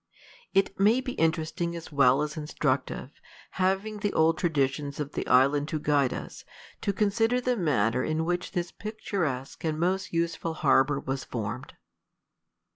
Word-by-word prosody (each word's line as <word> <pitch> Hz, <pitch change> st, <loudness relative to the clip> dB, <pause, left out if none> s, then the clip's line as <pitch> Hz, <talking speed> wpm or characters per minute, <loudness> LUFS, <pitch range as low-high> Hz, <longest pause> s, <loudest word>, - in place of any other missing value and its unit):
It 195 Hz, 0 st, +2 dB
may 215 Hz, +5 st, +5 dB
be 260 Hz, 0 st, -4 dB
interesting 165 Hz, -1 st, -1 dB
as 170 Hz, -1 st, -8 dB
well 140 Hz, 0 st, +4 dB
as 150 Hz, 0 st, -4 dB
instructive, 145 Hz, -3 st, -2 dB, 0.4 s
having 195 Hz, +3 st, 0 dB
the 205 Hz, -1 st, -1 dB
old 160 Hz, +1 st, +4 dB
traditions 140 Hz, -3 st, 0 dB
of 145 Hz, -1 st, -3 dB
the -, -, -4 dB
island 140 Hz, +3 st, +4 dB
to 155 Hz, -1 st, -2 dB
guide 145 Hz, -3 st, +2 dB
us, -, -, -7 dB, 0.4 s
to 200 Hz, -, +1 dB
consider 225 Hz, +4 st, +2 dB
the 250 Hz, 0 st, 0 dB
manner 130 Hz, -, +1 dB
in 155 Hz, +1 st, -1 dB
which 175 Hz, +2 st, -2 dB
this 175 Hz, -1 st, -2 dB
picturesque 185 Hz, -, -4 dB
and 155 Hz, -1 st, -1 dB
most 185 Hz, +2 st, 0 dB
useful 165 Hz, -1 st, -1 dB
harbor 140 Hz, -1 st, +3 dB
was 135 Hz, -1 st, -3 dB
formed. 105 Hz, -, -5 dB
160 Hz, 150 wpm, -28 LUFS, 140-190 Hz, 0.4 s, may